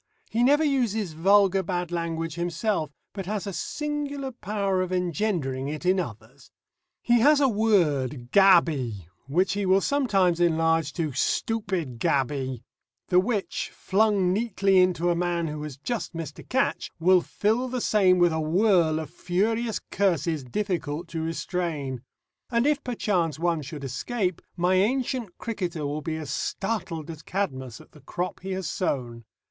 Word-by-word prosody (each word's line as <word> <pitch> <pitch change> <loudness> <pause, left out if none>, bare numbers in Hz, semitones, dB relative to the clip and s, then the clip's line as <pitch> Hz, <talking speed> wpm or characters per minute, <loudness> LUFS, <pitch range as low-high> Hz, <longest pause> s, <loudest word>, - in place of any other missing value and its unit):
He 230 - +1
never 290 +5 +4
uses 225 - 0
vulgar 195 +3 +4
bad 175 -1 -3
language 165 -1 -2
himself, 175 0 -1 0.2
but 195 -3 -6
has 210 0 -2
a 200 - -4
singular 285 - -3
power 200 -5 -1
of 185 0 -3
engendering 175 -7 -1
it 155 +4 -5
in 185 +1 +3
others. - - -7 0.5
He 240 0 +4
has 290 +5 +5
a 280 - +4
word 150 - +1
"gaby," 155 - +4 0.2
which 175 +6 +1
he 205 0 -1
will 190 +1 +5
sometimes 195 -10 +2
enlarge 165 -2 +2
to 160 -4 -2
"stuppid 170 - -1
gaby," 130 -2 0 0.5
the 180 - +5
which, 205 +1 -1
flung 195 -2 +2
neatly 195 -3 +2
into 175 -1 +3
a - - +1
man 170 -1 0
who 150 0 -5
has 150 -3 -6
just 215 - -4
missed 165 -2 -6
a - - -9
catch, 265 +2 0
will 180 +2 +5
fill 220 +8 0
the 255 0 -3
same 195 -5 +4
with 175 -2 +4
a 160 - -1
whirl 170 -1 +3
of 155 -3 -6
furious 220 +5 0
curses 170 -6 +1
difficult 170 - -3
to 165 - -3
restrain. 160 -5 -3 0.5
And 235 0 +1
if 295 -1 +2
perchance 185 - 0
one 170 -1 0
should 140 +1 -8
escape, 180 - -2 0.2
my 180 +2 +2
ancient 235 +1 0
cricketer 180 -9 -3
will 145 +2 -3
be 160 0 -3
as 155 -4 -5
startled 175 -7 -3
as 160 -1 -10
Cadmus 130 - -3
at - - -17
the 150 - -17
crop 180 +6 -4
he 190 +1 -5
has 185 -3 -3
sown. 120 - -3
180 Hz, 155 wpm, -26 LUFS, 160-210 Hz, 0.5 s, has